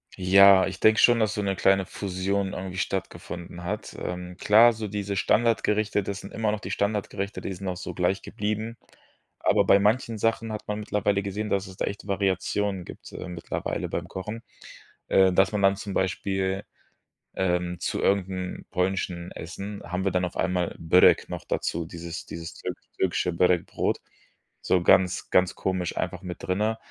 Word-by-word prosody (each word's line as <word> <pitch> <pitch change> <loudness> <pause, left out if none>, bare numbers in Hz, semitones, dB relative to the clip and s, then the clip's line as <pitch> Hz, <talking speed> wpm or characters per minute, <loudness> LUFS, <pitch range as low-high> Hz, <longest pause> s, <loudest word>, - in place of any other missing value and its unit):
Ja, 95 +1 +7
ich 95 0 -6
denke 110 0 +5
schon, 120 -1 +6
dass 110 -1 +1
so 105 - -2
'ne 100 -1 0
kleine 95 0 +3
Fusion 95 +1 -2
irgendwie 95 0 -5
stattgefunden 85 -2 -4
hat. 105 +4 -4
Ähm, 90 0 -5
klar, 115 +3 +7
so 110 -1 -5
diese 100 0 -3
Standardgerichte, 110 -1 +2
das 100 +1 -5
sind 100 - -10
immer 110 -2 0
noch 105 - -2
die 95 - -5
Standardgerichte, 100 0 -2
die 95 - -4
sind 95 +1 -7
auch 90 - -2
so - - -6
gleich 95 +2 0
geblieben. 110 +2 -3 0.6
Aber - - +3
bei 100 - +6
manchen 110 +2 +1
Sachen 115 +1 0
hat 105 - -7
man 105 0 -2
mittlerweile 105 -1 0
gesehen, 105 +2 -3
dass 100 0 0
es 95 - -12
da - - 0
echte 100 0 -6
Variationen 95 -1 0
gibt, - - -11
äh, - - -6
mittlerweile 90 -2 -4
beim - - -3
Kochen. 105 +5 -6 0.7
Äh, 95 -1 +5
dass 95 +2 +3
man 105 -2 -1
dann 95 0 +4
zum 100 -1 -6
Beispiel, 95 +1 -1 0.7
ähm, 90 -1 0
zu - - -2
irgend 100 -1 +2
'n 95 -1 -5
polnischen 90 -2 -1
Essen, 100 +4 -7
haben 90 +2 -3
wir 95 - +2
dann 90 0 +1
auf 90 - -6
einmal 90 -1 0
Börek 85 +3 +5
noch - - -5
dazu, 85 0 -2
dieses 85 +1 -7
dieses 85 0 -7
türki - - -7
türkische 90 -1 0
Börek 90 0 +3
Brot. - - -1 0.6
So 90 - +2
ganz 95 0 +3
ganz 90 -1 +3
komisch 95 -2 -2
einfach - - -2
mit 90 -1 -7
drinnen. 105 +4 0
95 Hz, 180 wpm, -26 LUFS, 90-105 Hz, 0.7 s, Ja